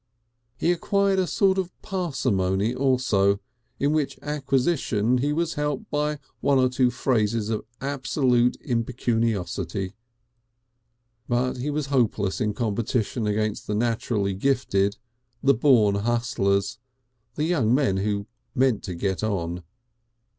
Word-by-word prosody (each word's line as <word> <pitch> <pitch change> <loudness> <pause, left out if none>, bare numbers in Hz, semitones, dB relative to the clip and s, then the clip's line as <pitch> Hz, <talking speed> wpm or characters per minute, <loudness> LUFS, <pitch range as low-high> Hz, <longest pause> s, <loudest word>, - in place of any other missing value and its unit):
He 170 - +2
acquired 195 +2 +1
a 185 - +1
sort 190 +1 +2
of 180 -1 -5
parsimony 120 - 0
also, 125 -7 +2 0.4
in 145 +2 +2
which 155 -3 0
acquisition 135 -5 +1
he 145 +3 0
was 165 +2 0
helped 150 -2 -3
by 150 0 0 0.2
one 140 -1 +3
or 130 -1 +4
two 125 0 +2
phases 115 -3 0
of 110 - -2
absolute 130 -3 +1
impecuniosity. 110 - -1 1.4
But 125 +1 0
he 130 +4 -3
was 150 0 -1
hopeless 110 -5 +1
in 105 -2 0
competition 115 0 -1
against 110 0 -1
the 105 - -1
naturally 110 -3 0
gifted, 100 -3 +1 0.5
the 140 0 +5
born 115 -5 +4
hustlers, 100 -2 0 0.6
the 150 - -1
young 155 -9 +2
men 115 -9 +2
who 100 +1 -1 0.3
meant 130 -4 +2
to 90 - -5
get 95 +1 -1
on. 90 -5 -2
120 Hz, 125 wpm, -25 LUFS, 105-140 Hz, 1.4 s, the